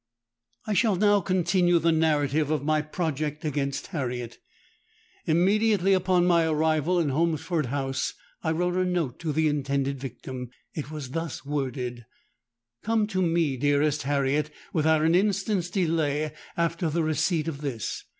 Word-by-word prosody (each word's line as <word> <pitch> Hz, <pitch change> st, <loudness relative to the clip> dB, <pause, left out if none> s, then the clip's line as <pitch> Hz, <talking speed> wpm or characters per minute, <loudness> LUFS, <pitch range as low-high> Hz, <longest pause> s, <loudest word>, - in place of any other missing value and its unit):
"I 215 Hz, -, -1 dB
shall 210 Hz, 0 st, +3 dB
now 205 Hz, +1 st, +4 dB
continue 175 Hz, -1 st, +2 dB
the 165 Hz, 0 st, +2 dB
narrative 155 Hz, -2 st, +2 dB
of 155 Hz, -3 st, 0 dB
my 155 Hz, +1 st, +2 dB
project 155 Hz, -1 st, -3 dB
against 140 Hz, -2 st, -2 dB
Harriet. 125 Hz, -6 st, -4 dB, 0.9 s
Immediately 195 Hz, +3 st, +3 dB
upon 185 Hz, -1 st, +3 dB
my 170 Hz, -2 st, +4 dB
arrival 160 Hz, +2 st, +2 dB
at 160 Hz, -4 st, +1 dB
Holmesford 160 Hz, +1 st, 0 dB
House, 135 Hz, 0 st, -2 dB, 0.3 s
I 160 Hz, -, +1 dB
wrote 175 Hz, +2 st, 0 dB
a 185 Hz, -, +2 dB
note 175 Hz, -8 st, -1 dB
to 160 Hz, -2 st, -2 dB
the 155 Hz, +2 st, +2 dB
intended 140 Hz, -2 st, -1 dB
victim: 130 Hz, -1 st, -7 dB, 0.2 s
it 150 Hz, -2 st, -5 dB
was 150 Hz, -4 st, -6 dB
thus 165 Hz, -2 st, -4 dB
worded:—'_Come 125 Hz, -, -4 dB
to 185 Hz, -2 st, 0 dB
me, 165 Hz, -5 st, +1 dB
dearest 145 Hz, +2 st, +2 dB
Harriet, 140 Hz, +2 st, 0 dB, 0.2 s
without 155 Hz, -1 st, +3 dB
an 165 Hz, +1 st, +3 dB
instant's 195 Hz, -1 st, +1 dB
delay 155 Hz, -5 st, 0 dB, 0.3 s
after 170 Hz, 0 st, 0 dB
the 165 Hz, +2 st, 0 dB
receipt 155 Hz, +1 st, 0 dB
of 150 Hz, -3 st, -4 dB
this. 125 Hz, -8 st, -4 dB
155 Hz, 140 wpm, -26 LUFS, 140-175 Hz, 0.9 s, now